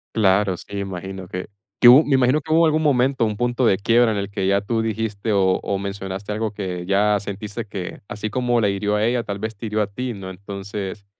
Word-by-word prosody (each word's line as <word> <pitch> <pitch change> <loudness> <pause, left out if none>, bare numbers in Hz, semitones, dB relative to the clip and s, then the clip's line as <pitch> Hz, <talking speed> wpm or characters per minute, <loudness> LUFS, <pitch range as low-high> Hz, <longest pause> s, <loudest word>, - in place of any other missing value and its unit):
Claro, 95 -3 +3
sí, 100 +3 -8
imagino 95 -1 -6
que 90 0 -5 0.3
que 120 - +8
hub 130 +6 +9
me 145 - +2
imagino 130 +4 +3
que 155 - -5
hubo 165 +1 +5
algún 155 0 +2
momento, 130 -4 +2
un 105 -1 -1
punto 120 +2 0
de 105 -5 +4
quiebra 115 +2 +3
en 110 - -1
el 100 0 -3
que 95 -2 -1
ya 100 +1 +3
tú 110 +3 -1
dijiste 110 -1 -2
o 95 -2 +2
o 100 - -1
mencionaste 100 0 -5
algo 110 0 -2
que 90 -4 -5
ya 100 +2 +2
sentiste 105 +3 -6
que, 95 -3 -6
así 105 +1 -4
como 120 0 +1
la 105 - +2
hirió 105 +1 0
a 105 - +1
ella, 120 +1 +1
tal 100 -3 -5
vez 110 +2 -4
te 110 - -6
hirió 110 0 -1
a - - 0
ti, 125 +5 -4
¿no? 95 -2 -7
Entonces, 100 +1 -7
105 Hz, 235 wpm, -22 LUFS, 100-115 Hz, 0.3 s, hub